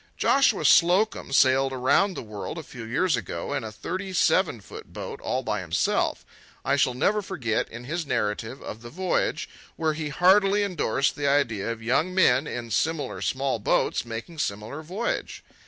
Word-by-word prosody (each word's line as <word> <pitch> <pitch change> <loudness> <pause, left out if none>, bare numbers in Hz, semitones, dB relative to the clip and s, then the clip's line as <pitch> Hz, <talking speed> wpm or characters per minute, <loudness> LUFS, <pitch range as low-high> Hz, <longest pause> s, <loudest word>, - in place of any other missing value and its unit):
Joshua 270 -6 +3
Slocum 180 -1 +4
sailed 135 0 +4
around 135 +10 +2
the - - -5
world 105 +7 -6
a 165 - -5
few 120 -4 -10
years 150 +8 +1
ago 85 -7 -4
in - - -2
a 110 - -6
thirty 185 - -5
seven 175 - +2
foot 100 - -11
boat - - -7
all - - -2
by - - -2
himself. - - 0 0.4
I 135 +2 +2
shall 130 -3 +2
never 205 +11 +1
forget, 145 - -2
in 120 +1 -9
his 165 +7 -3
narrative 110 +4 -2
of 110 - -7
the 120 - -9
voyage, 185 +6 -1 0.3
where 160 -1 0
he 155 -1 -4
heartily 195 +5 +4
indorsed 150 - 0
the 145 -1 -1
idea 120 -8 +1
of 115 -1 -7
young 155 +10 +1
men, 140 -6 +4
in 120 -1 -5
similar 150 +3 -1
small 135 -3 -1
boats, - - +1
making 115 +8 -7
similar 105 +6 -3
voyage. 190 +9 -4
140 Hz, 170 wpm, -25 LUFS, 120-180 Hz, 0.4 s, Slocum